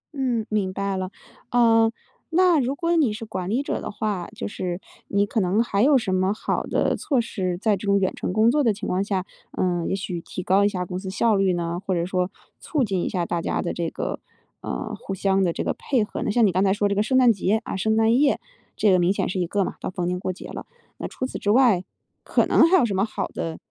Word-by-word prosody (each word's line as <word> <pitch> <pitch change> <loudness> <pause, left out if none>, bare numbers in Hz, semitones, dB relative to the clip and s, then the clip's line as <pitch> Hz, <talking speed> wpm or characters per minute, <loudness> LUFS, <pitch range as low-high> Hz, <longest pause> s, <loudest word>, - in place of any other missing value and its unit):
嗯， 245 -5 0
明 200 -3 0
白 195 0 -2
了。 185 -1 -3 0.4
呃， 225 -2 +4 0.4
那 350 -1 +4
如 265 +2 0
果 335 +3 0
你 290 -10 +3
是 220 +2 -6
管 185 -4 -4
理 250 +6 0
者 - - -3
的 - - -5
话， 205 -4 -3
就 225 - -4
是 180 -3 -4 0.3
你 200 0 +2
可 220 - -1
能 190 +4 +2
还 200 -4 0
有 275 +3 +5
什 195 -6 -1
么 185 +1 +2
好 215 - -2
的 - - 0
措 275 -5 0
施， 185 -6 -2
在 215 0 +2
这 195 +2 -7
种 200 0 +4
远 190 - 0
程 - - -3
工 220 +4 +4
作 295 +2 +2
的 230 - +4
情 205 +1 -6
况 185 +2 0
下， 195 -2 -2 0.3
呃 175 -2 0
也 - - 0
许 180 -3 -4
提 185 - -7
高 190 +3 +3
一 205 - +4
下 180 -3 -3
公 180 +1 -5
司 190 -1 -6
效 215 +2 +2
率 195 -1 +2
呢？ 170 0 -2
或 190 - 0
者 170 0 0
说 180 0 -1 0.3
促 295 -5 -1
进 195 -5 -1
一 - - -1
下 175 -3 -1
大 170 0 -2
家 - - -1
的 175 - -2
这 170 -1 -2
个， - - -4 0.4
呃， - - -4
互 195 - -6
相 195 0 +2
的 175 - +2
这 - - -3
个 - - -1
配 255 -6 0
合 210 - -5
呢？ - - -1
像 230 +1 +4
你 200 - +3
刚 185 +2 +1
才 195 - +3
说 205 0 +1
这 200 - 0
个 205 - +2
圣 260 +5 +2
诞 250 -3 +6
节， 210 +3 0
啊 - - -5
圣 220 +3 +1
诞 225 +1 +4
夜， 285 -1 +3 0.4
这 210 - +3
个 185 - +4
明 175 +2 +3
显 - - -1
是 185 - -2
一 175 - 0
个 200 +2 +1
嘛， - - -4
到 - - -3
逢 180 -1 -3
年 180 0 -1
过 185 - -2
节 185 - -9
了。 - - -8 0.3
那 - - -4
除 255 - -4
此 255 - -5
之 205 - -2
外， 225 -6 +4 0.4
可 - - +2
能 - - +5
还 375 - +6
有 275 - +4
什 205 - -2
么 190 +1 +1
好 220 - -2
的 165 -1 -4
200 Hz, 285 characters per minute, -24 LUFS, 185-230 Hz, 0.4 s, 诞